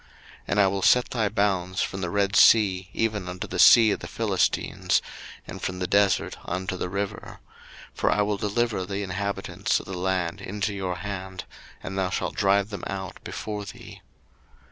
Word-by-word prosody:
02:023:031 - - -27 0.4
And 105 - 0
I 100 - +6
will 95 0 -2
set 125 +5 +4
thy 110 -4 0
bounds 95 -2 0
from 95 - -4
the 90 - -2
Red 100 +1 0
sea 95 -4 +5
even 105 -5 -1
unto 90 0 -5
the - - -5
sea 115 -2 +8
of - - -1
the - - -7
Philistines, - - 0 0.5
and - - -8
from 90 - -3
the 90 - -2
desert 100 0 +2
unto 95 +1 -3
the 90 - -3
river: 100 +1 -5 0.5
for - - 0
I 105 - +2
will 105 0 -1
deliver 105 0 -1
the 100 +2 -4
inhabitants 100 +1 -2
of - - -11
the 95 - -7
land 90 -2 -1
into 105 +1 -3
your 95 -2 -3
hand; 95 0 -6 0.4
and 95 - -5
thou 95 -1 0
shalt - - -2
drive 100 +1 +2
them 100 - -6
out 95 -1 -6
before 105 -1 -5
thee. - - -11
100 Hz, 185 wpm, -25 LUFS, 95-105 Hz, 0.5 s, sea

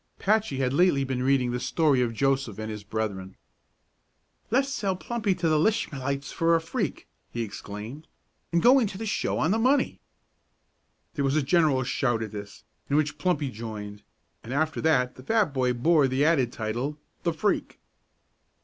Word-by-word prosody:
Patchy 210 -8 +1
had 130 -1 0
lately 145 -3 +3
been 130 -2 -2
reading 130 -2 +2
the 125 - -2
story 140 0 +2
of 120 -2 +1
Joseph 135 -2 0
and 110 0 -4
his 105 -1 -7
brethren. 100 -3 -4 1.1
"Le's 270 +4 +1
sell 195 -7 -1
Plumpy 205 0 -1
to 175 -2 -1
the 155 -1 +3
Lishmalites 140 - -1
for 165 0 +2
a - - +3
freak!" 170 - -3 0.2
he 120 - -3
exclaimed, 110 +7 -8 0.4
"an' 170 0 +2
go 255 +4 +7
into 205 -6 -1
the 225 - -5
show 215 - -1
on 160 - +1
the 220 - +2
money." 265 +5 +2 1.1
There 145 - -1
was 135 +1 +1
a 155 - +2
general 145 -3 +3
shout 120 -2 0
at 110 - -6
this, 105 -1 -9 0.3
in 140 - +1
which 150 -1 0
Plumpy 165 -7 0
joined, 105 -2 -7 0.4
and 120 - -8
after 155 +2 0
that 125 -6 +2
the 130 - -11
fat 210 - +1
boy 130 -2 +1
bore 145 +4 +3
the 130 +3 +1
added 135 -7 +3
title, 120 +7 -3 0.2
"The 170 - 0
Freak." 200 +6 -1
140 Hz, 175 wpm, -26 LUFS, 120-170 Hz, 1.1 s, go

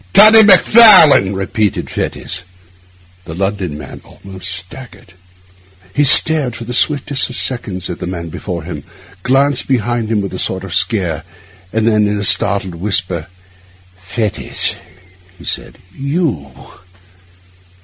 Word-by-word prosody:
'Toddy 215 +2 +8
Macfarlane!' 195 - +6
repeated 100 +2 -2
Fettes. 90 - -3 0.8
The 80 -1 -9
London 95 -4 -3
man 75 - -11
almost 95 -1 -9
staggered. 95 +2 -4 0.8
He 145 - +1
stared 140 -2 +4
for 120 - -8
the 120 +2 -7
swiftest 140 0 0
of 125 - -7
seconds 100 -10 -3
at 90 - -7
the - - -6
man 85 -2 -6
before 85 0 -7
him, 75 -4 -8 0.4
glanced 135 +3 0
behind 120 -3 -2
him 110 -2 0
with 100 -2 -5
a 95 - -6
sort 95 0 -1
of 95 -3 -8
scare, 95 -6 -1 0.5
and 110 0 -1
then 105 -2 +2
in 105 0 -2
a 100 - -4
startled 100 -1 +1
whisper, 90 -2 -2 0.7
'Fettes!' 95 +3 -3 0.6
he - - -15
said, - - -5 0.2
'You! 140 - -3
105 Hz, 130 wpm, -14 LUFS, 90-130 Hz, 0.8 s, Toddy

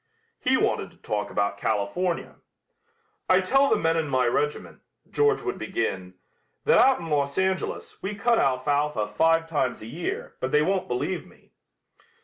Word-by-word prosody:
He - - +2
wanted - - 0
to - - -23
talk 105 -1 -3
about 100 0 -1
California. 110 - -1 0.9
"I 185 0 +6
tell 270 +9 +3
the - - +4
men 165 0 +1
in 160 -2 0
my 130 -2 +1
regiment," 145 +5 -2 0.3
George 435 -1 +2
would 385 - -3
begin, 95 - -3 0.5
"that - - +5
out 265 -1 +5
in 170 - -7
Los 140 -2 0
Angeles 190 0 -2
we 200 +2 -4
cut 230 +3 +2
alfalfa 140 -2 +1
five 165 +10 +2
times 140 -8 -1
a - - -7
year, 160 +10 -5
but 130 - -2
they 150 0 +4
won't 190 +2 0
believe 125 0 -2
me." - - -22
150 Hz, 160 wpm, -25 LUFS, 125-185 Hz, 0.9 s, I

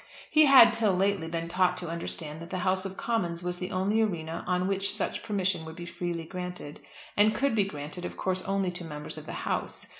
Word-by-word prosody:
He 310 -1 +7
had, 260 -4 +9
till 215 -5 +2
lately, 195 -2 +1
been 165 0 -3
taught 180 +1 +2
to 180 -1 -4
understand 160 -2 -4
that 170 - -8
the 185 - -3
House 185 0 +1
of 190 0 -6
Commons 175 -7 -1
was 180 0 -3
the 180 - -3
only 200 +4 +1
arena 165 -6 -2
on 180 0 +1
which 195 0 0
such - - -2
permission 190 -5 -1
would 160 0 -8
be 175 - -7
freely 170 -1 -4
granted, 180 -4 -6 0.4
and 215 +1 +4
could 275 +2 +1
be 210 -3 +3
granted 150 0 -6
of - - -6
course 185 -1 -1
only 195 -2 0
to 180 0 -7
Members 150 -2 -6
of - - -12
the - - -5
House. - - -2
180 Hz, 220 wpm, -29 LUFS, 170-195 Hz, 0.4 s, had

